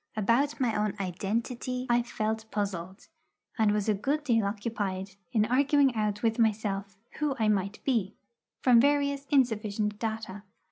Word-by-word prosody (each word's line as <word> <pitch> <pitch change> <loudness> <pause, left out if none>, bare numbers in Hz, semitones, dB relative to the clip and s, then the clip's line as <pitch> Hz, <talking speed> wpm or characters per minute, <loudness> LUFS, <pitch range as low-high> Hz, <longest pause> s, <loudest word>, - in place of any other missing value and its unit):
About 235 +9 +2
my 245 -4 +1
own 210 -1 0
identity 230 +7 -3
I 240 -1 +3
felt 220 -1 -3
puzzled, 195 -2 -4 0.5
and 220 -1 +4
was 210 0 0
a 215 - +4
good 280 +9 -1
deal 230 -7 +2
occupied 200 -2 -3 0.2
in 215 -4 +3
arguing 275 +2 +3
out 210 -1 -1
with 225 0 +1
myself 205 -3 0 0.2
who 300 -3 0
I 220 -3 +1
might 200 0 0
be, 220 -7 0 0.5
from 245 -3 +6
various 280 0 +1
insufficient 215 -6 +1
data. 220 -3 -4
220 Hz, 145 wpm, -29 LUFS, 205-250 Hz, 0.5 s, from